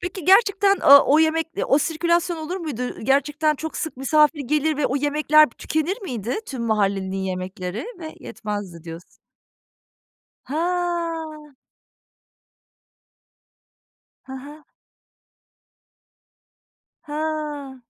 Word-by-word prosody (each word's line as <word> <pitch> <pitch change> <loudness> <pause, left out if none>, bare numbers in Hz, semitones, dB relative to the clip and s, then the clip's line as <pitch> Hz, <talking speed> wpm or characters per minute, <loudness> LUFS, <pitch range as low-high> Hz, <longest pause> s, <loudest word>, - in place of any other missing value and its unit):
Peki, 360 -1 -6
gerçekten, 395 0 +4
o 280 0 +7
o - - +6
yemek, 320 0 +2 0.2
o 275 - +4
sirkülasyon 340 +3 0
olur 320 +4 -5
muydu? 300 -9 -5
Ü 250 - -5
gerçekten 290 +4 +1
çok 320 +2 -6
sık 320 -5 -4
misafir 300 +3 +3
gelir 300 +3 0
ve 295 - +1
o 265 - -1
yemekler 300 +1 +4
pı - - -27
tükenir 345 +8 -2
miydi 240 - -4
tüm 255 -4 -5
mahallelinin 195 -4 0
yemekleri? 185 - -4
"Ve 315 -2 -8
yetmezdi." 205 -6 -6
diyorsun. 165 +1 -9 1.4
Ha. 330 -2 -3 2.7
Ha 265 - -8
ha. 300 +1 -12 2.4
Ha. 300 -3 -4
300 Hz, 105 wpm, -22 LUFS, 250-320 Hz, 2.7 s, o